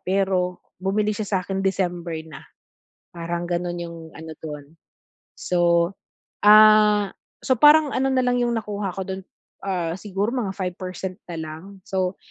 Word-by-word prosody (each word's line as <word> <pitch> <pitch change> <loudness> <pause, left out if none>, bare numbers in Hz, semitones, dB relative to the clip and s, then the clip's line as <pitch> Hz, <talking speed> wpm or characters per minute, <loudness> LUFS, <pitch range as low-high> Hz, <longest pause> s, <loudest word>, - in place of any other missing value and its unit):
pero 185 -1 0 0.2
bumili 205 +3 +1
siya 210 0 -4
sa'kin 190 +1 -4
December 175 -4 -1
na, 150 - -10 0.7
parang 170 0 -3
gano'n 175 0 -2
'yong 170 -1 -7 0.2
ano 160 0 -8
do'n. 150 -2 -7 0.7
So, 180 - -1 0.9
ah, 210 -1 +7 0.3
so 260 - +2
parang 295 +2 +7
ano 270 +1 +1
na 255 - +3
lang 245 0 +2
'yong 240 0 +1
nakuha 205 -3 -3
ko 190 - -3
do'n, 190 0 -5 0.4
ah, 175 -4 -1
siguro 200 +2 -2
mga 225 -7 -1
5% 185 0 -5
na 170 - -5
lang, 160 0 -6 0.2
so, 185 -2 -1
190 Hz, 140 wpm, -23 LUFS, 175-210 Hz, 0.9 s, ah